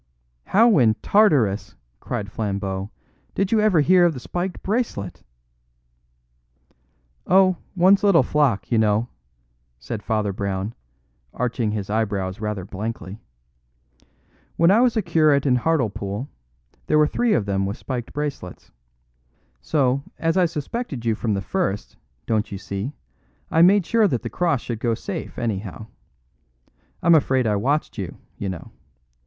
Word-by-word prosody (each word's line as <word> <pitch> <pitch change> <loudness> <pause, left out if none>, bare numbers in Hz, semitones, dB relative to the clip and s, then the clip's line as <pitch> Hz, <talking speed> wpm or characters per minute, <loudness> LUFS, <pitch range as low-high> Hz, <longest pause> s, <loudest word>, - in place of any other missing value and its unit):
"How 225 -3 +5
in 110 -3 +4
Tartarus," 145 - +3 0.2
cried 100 -2 -5
Flambeau, 100 -2 -3 0.5
"did 195 0 0
you 225 - +4
ever 210 -7 +4
hear 180 +4 +5
of 170 -3 +3
the - - -5
spiked 175 +7 -4
bracelet?" 200 - -2 2.1
"Oh, 185 -1 +4 0.2
one's 190 +3 +5
little 200 -5 +5
flock, 130 -11 +1
you 115 - +3
know!" 110 +2 +2 0.7
said 100 - -6
Father 105 -3 -1
Brown, 100 +2 -3 0.6
arching 120 -2 -1
his 105 -2 -3
eyebrows 100 -3 -1
rather 105 -4 -3
blankly. 105 0 -6 1.4
"When 170 +2 +4
I 220 +4 +5
was 245 -2 +3
a 215 - +1
curate 155 -5 +3
in 125 -3 +3
Hartlepool, 120 -6 -1 0.6
there 155 - +3
were 150 - +5
three 230 +8 +1
of 105 - +1
them 95 -1 0
with 100 - -4
spiked 125 -3 -5
bracelets. 145 -11 -6 0.9
So, 135 -3 +1 0.2
as 165 0 0
I 185 -2 +4
suspected 155 - -5
you 115 - +2
from 110 -1 -1
the 95 - -2
first, 105 - -2 0.3
don't 110 -2 -1
you 100 - -4
see, 100 +5 -5 0.6
I 160 - +4
made 190 +1 +5
sure 225 +3 +3
that 125 - -2
the - - -5
cross 170 -8 0
should 115 -3 -5
go 115 -1 0
safe, - - -6
anyhow. 110 -2 -4 1.2
I'm 170 - +6
afraid 130 -5 +3
I 105 -2 +1
watched 135 +4 -1
you, 95 -3 -5 0.2
you 100 - -4
know. 90 -3 -7
125 Hz, 145 wpm, -22 LUFS, 105-170 Hz, 2.1 s, I'm